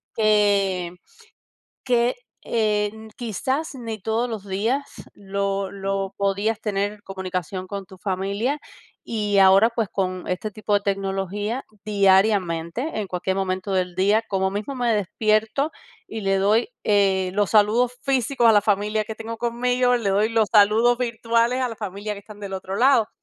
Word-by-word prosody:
Que 200 -5 +2 0.9
que, 245 -1 +2 0.3
en 215 0 -1
quizás 260 - -2
ni 225 -3 -6
todos 225 +5 -1
los 210 -3 -6
días 225 +9 0 0.3
lo 195 -1 -2
lo 195 0 -3
podías 200 +2 0
tener 205 0 -2
comunicación 185 -1 -4
con 200 -1 -5
tu 190 0 -14
familia 200 +8 -1 0.5
y 210 -3 0
ahora, 195 +3 +7
pues, 230 -3 -2
con 185 -2 -3
este 185 +4 -3
tipo 210 0 -2
de 205 - +4
tecnología, 195 +4 -2 0.2
diariamente, 195 - +2
en 200 - -4
cualquier 185 +1 -2
momento 190 0 -2
del 180 -1 -1
día, 205 +4 +3
como 190 -1 0
mismo 215 +7 -4
me 240 -2 +1
despierto 215 - 0 0.4
y 220 - -5
le 195 0 +2
doy, 210 - +2 0.2
eh, 195 -3 +2
los 205 -2 +1
saludos 225 +4 +3
físicos 260 -2 +2
a - - +7
la 205 - +5
familia 210 +1 +1
que 220 0 -7
tengo 225 0 -6
conmigo, 245 +1 +1
le 210 -5 -1
doy 205 +3 +2
los 225 -2 +2
saludos 225 +3 +5
virtuales 235 +1 +1
a 250 - +1
la 230 - -6
familia 205 0 -5
que 200 - -10
están 205 0 -13
del 200 -1 -6
otro 190 +1 -5
lado. 240 -2 +4
210 Hz, 155 wpm, -23 LUFS, 195-230 Hz, 0.9 s, ahora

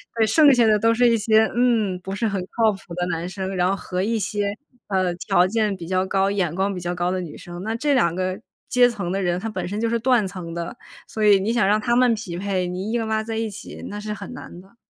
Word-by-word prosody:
对 225 - +3
剩 285 +5 +6
下 240 -2 +4
的 215 -1 +5
都 225 +2 +3
是 240 +1 +4
一 230 - +3
些 220 0 +4
嗯， 225 -7 +2
不 190 +2 -6
是 225 +3 0
很 200 -2 -1 0.2
靠 225 -2 +4
谱 195 -3 -10
的 175 +1 -2
男 170 0 -3
生， 190 0 -4
然 180 0 +2
后 195 - +1
和 185 -1 -3
一 225 +1 0
些， 205 0 -1 0.4
呃， 185 -2 +1
条 180 0 +2
件 210 0 0
比 170 -3 -9
较 185 0 +1
高、 195 0 +1
眼 190 -5 -1
光 195 +2 -1
比 180 - -4
较 175 0 -3
高 175 0 -1
的 185 0 -1
女 165 -4 -8
生， 175 +1 -9
那 220 +2 -2
这 285 +4 +1
2 170 -10 +3
个 185 +1 -2 0.3
阶 250 0 +5
层 195 -7 -4
的 195 - -1
人， 175 0 0
他 225 +4 -4
本 215 - -4
身 205 +4 -3
就 230 - +1
是 235 - +1
断 240 -3 +2
层 180 -3 -7
的， 170 +8 -5 0.3
所 215 -1 -2
以 205 -2 +6
你 205 +4 -1
想 235 -5 +2
让 210 +2 +3
他 235 +2 +1
们 245 -1 +4
匹 200 -6 -5
配， 185 -1 -1
你 185 +4 -4
硬 230 -1 -1
拉 220 0 0
在 225 0 -5
一 225 0 -1
起， 205 +1 -9
那 205 - -6
是 210 0 -4
很 210 - -8
难 180 -8 -10
的。 195 +5 -22
200 Hz, 285 characters per minute, -23 LUFS, 185-225 Hz, 0.4 s, 剩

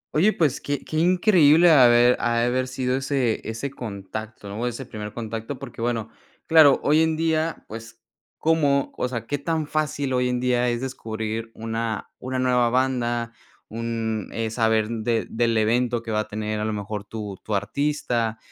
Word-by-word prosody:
Oye, 190 +8 +4
pues, 150 -9 0
que 145 -1 -3
que 155 - -4
increíble 175 -2 +5
ave 120 -3 +6
ha 120 0 0
de 115 - +2
haber 130 +1 0
sido 130 0 -1
ese 135 -4 0
ese 115 +5 -4
contacto, 110 -3 -7
o 120 +2 -2
ese 120 +2 -5
primer 105 -3 -7
contacto, 115 +3 -5
porque 125 -3 -9
bueno, 115 -2 -1 0.4
claro, 155 -4 +6
hoy 155 +2 +4
en 160 -1 +1
día, 160 0 -1
pues, 115 +1 -10 0.4
cómo, 145 -4 +1
o - - -1
sea, 115 -2 -4
qué 145 +4 -2
tan 160 +1 -1
fácil 145 -3 -1
hoy 125 0 +1
en 125 - 0
día 125 0 +1
es 120 +1 -2
descubrir 110 -3 -4
una 115 -1 -4
una 130 +1 -4
nueva 125 -2 +2
banda, 120 -2 0 0.4
un, 115 -2 -3
eh, 115 -1 -2
saber 110 -2 +2
de 115 0 -1
del 115 0 +1
evento 120 +2 +1
que 115 - -5
va 105 - +1
a 110 - -2
tener 105 0 -3
a 105 - -1
lo 110 - -1
mejor 105 0 -5
tu 105 -3 -6
tu 105 - -2
artista. 115 0 -1
120 Hz, 180 wpm, -24 LUFS, 110-140 Hz, 0.4 s, ave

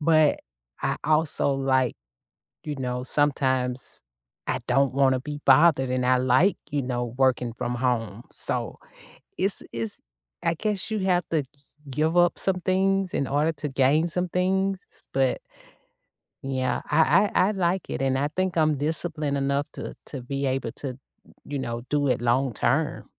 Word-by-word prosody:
But 155 -1 +4 0.4
I - - 0
also 155 -2 +2
like, 130 -2 +1 0.7
you 150 -1 -4
know, 125 -2 -3
sometimes 130 -2 -1 0.5
I - - 0
don't 135 +1 +2
wanna 135 -1 +3
be 145 +2 -6
bothered, 135 -1 +5
and 125 0 0
I 130 0 +4
like, 130 +10 +3
you 145 -1 -1
know, 125 -1 -2
working 125 -3 +2
from 120 +1 -3
home. 115 -3 -1
So - - -1 0.6
it’s 195 +1 +4
it's 115 -2 -1 0.5
I 165 - +2
guess 210 +2 -3
you 215 - 0
have 180 -3 +1
to 155 -3 +1 0.5
give 155 +5 0
up 175 0 +4
some 185 -2 -1
things 190 0 +1
in 140 - 0
order 150 +3 +1
to 150 0 -5
gain 140 +4 +2
some 180 +1 -1
things, 190 +2 +1 0.4
but 135 -1 +1 1.1
yeah, 130 -1 -1
I 160 +6 +4
I 185 - +4
I - - +1
like 185 -1 0
it, - - -3
and 135 0 +1
I 145 - 0
think 185 +2 -2
I'm 155 -2 +3
disciplined 150 0 -2
enough 140 +1 0
to - - -6
to 135 - -6
be 135 +3 -3
able 130 -3 -2
to, 130 -2 -6 0.5
you 145 - -4
know, 120 -2 -4
do 145 -1 +1
it 125 - +1
long 120 +2 +1
term. 135 +8 0
140 Hz, 160 wpm, -25 LUFS, 130-165 Hz, 1.1 s, bothered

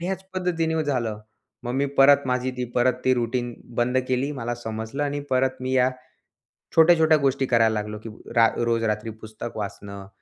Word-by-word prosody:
ह्याच 190 +2 -3
पद्धतीने 165 -3 0
झालं. 120 -7 -1 0.4
मग 120 - -4
मी 140 +1 +1
परत 140 0 +6
माझी 125 0 0
ती 125 - -2
परत 125 0 +3
ती 130 - +4
रुटीन 120 0 -2 0.2
बंद 125 +2 +2
केली. 130 +3 0
मला 120 -3 -3
समजलं 110 +4 -5
आणि 145 0 -2
परत 130 0 +1
मी 130 0 -3
या 130 0 +3 0.9
छोट्या-छोट्या 160 -1 +6
गोष्टी 135 -1 +1
करायला 115 -3 +3
लागलो, 105 0 -3
की 115 - -9 0.3
रा 115 -1 +6
रोज 115 -1 0
रात्री 105 0 -1
पुस्तक 110 +1 -8
वाचणं. 100 -1 -7
125 Hz, 170 wpm, -24 LUFS, 115-140 Hz, 0.9 s, परत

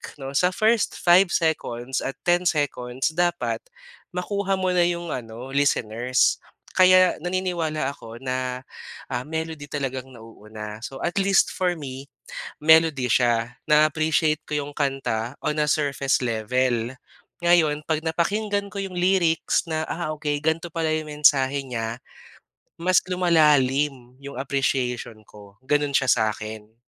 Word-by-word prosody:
'no. 135 -2 -7
Sa 160 +6 +3
first 220 0 +2
5 180 +2 +5
seconds 130 -7 -1
at 135 - -4
10 175 +1 +2
seconds, 135 -4 -1
dapat 175 +1 0 0.6
makuha 195 +2 -1
mo 185 -1 0
na 175 -1 +3
'yong 170 -2 -3
ano 120 +2 -6
listeners. 125 -3 +1 0.3
Kaya 185 0 +5
naniniwala 170 -5 -2
ako 115 -4 -11
na, 130 0 -3 0.5
ah, 125 0 -2
melody 160 0 -5
talagang 130 -2 -4
nauuna. 110 -2 -10
So, 135 +2 -7
at 175 - -1
least 195 0 +3
for 180 -1 0
me 135 -3 -8 0.5
melody 160 -4 +4
siya 120 0 +1
na-appreciate 155 0 +3
ko - - -10 0.2
yung - - -10
kanta 135 -5 -1
on 150 0 0
a 150 - +1
surface 140 -2 +1
level. 120 +1 0 0.5
Ngayon 155 -4 +3
'pag 155 -1 0
napakinggan 200 +5 -1
ko 200 - -4
yung 190 -2 -6
lyrics 175 -3 +2
na, 155 0 -1
ah, 165 -2 -3
okay 145 -1 -2
gan'to 160 +1 -1
pala 165 -1 0
yung 155 0 -1
mensahe 140 -2 +3
niya, 120 -1 -5 0.8
mas 185 +1 +4
lumalalim 145 -7 +2
yung 140 0 -8
appreciation 130 -4 -2
ko 100 -1 -15
ganun 145 +1 0
siya 135 -2 +3
sa'kin. 110 -1 -2
145 Hz, 135 wpm, -24 LUFS, 125-170 Hz, 0.8 s, 5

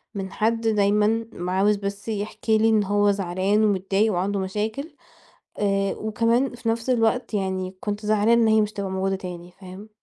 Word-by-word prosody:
من 195 -1 -4
حد 225 +1 0
دايمًا، 210 +1 +2 0.3
عاوز 200 +3 +3
بس 200 +1 -6
يحكي 220 +1 -1
لي 225 +1 +3
إن 215 -2 +3
هو 205 +1 +2
زعلان 195 +2 0
ومتضايق 200 +1 +1
وعنده 195 +3 -1
مشاكل 215 - -4 0.6
آآ، 195 -1 0
وكمان 230 +4 0
في 235 -1 -5
نفس 230 +2 -1
الوقت 235 -1 +1
يعني 190 -1 -2
كنت 210 0 -4
زعلانة 215 +2 +3
إن 225 - +3
هي 220 0 +4
مش 210 0 -1
هتبقى 200 -1 -4
موجودة 190 0 -1
تاني 180 -2 -8
فاهم؟ 190 +3 -10
205 Hz, 170 wpm, -24 LUFS, 195-220 Hz, 0.6 s, هي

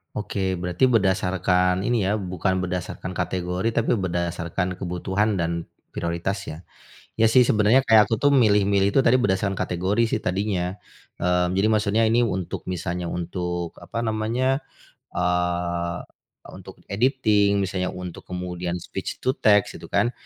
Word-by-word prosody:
Oke, 95 -2 -2
berarti 90 +7 +1
berdasarkan 95 -4 +2
ini 115 -1 +1
ya, 100 - +1
bukan 95 0 -1
berdasarkan 90 0 -4
kategori, 90 +4 -1
tapi 115 0 +1
berdasarkan 85 0 -2
kebutuhan 95 +4 -1
dan 85 0 -2 0.2
prioritas, 85 +4 -2
ya. 80 - -6 0.6
Iya 110 - +4
sih, 130 - +7
sebenarnya 110 +2 +4
kayak 110 -4 +6
aku 110 +1 -2
tuh 145 - +5
milih-milih 100 -6 +3
itu 135 - +5
tadi 130 0 +4
berdasarkan 100 -4 0
kategori 95 +6 0
sih 115 - -1
tadinya. 95 -1 -1 0.4
Eee 90 0 +1
Jadi 95 - +3
maksudnya 110 0 +2
ini 115 +2 +3
untuk 95 -6 -2
misalnya 90 -1 -3
untuk, 90 0 -3
apa 115 0 -4
namanya, 115 +5 0 0.5
eee, 90 -1 -1 0.5
untuk - - -11 0.2
editing 105 -4 +2
misalnya, 90 -1 -2
untuk 90 -2 -8
kemudian 90 -1 -4
speech - - -6
to 130 - +2
text 105 -3 +3
gitu - - -10
kan. 120 - +1
95 Hz, 140 wpm, -24 LUFS, 90-110 Hz, 0.6 s, sih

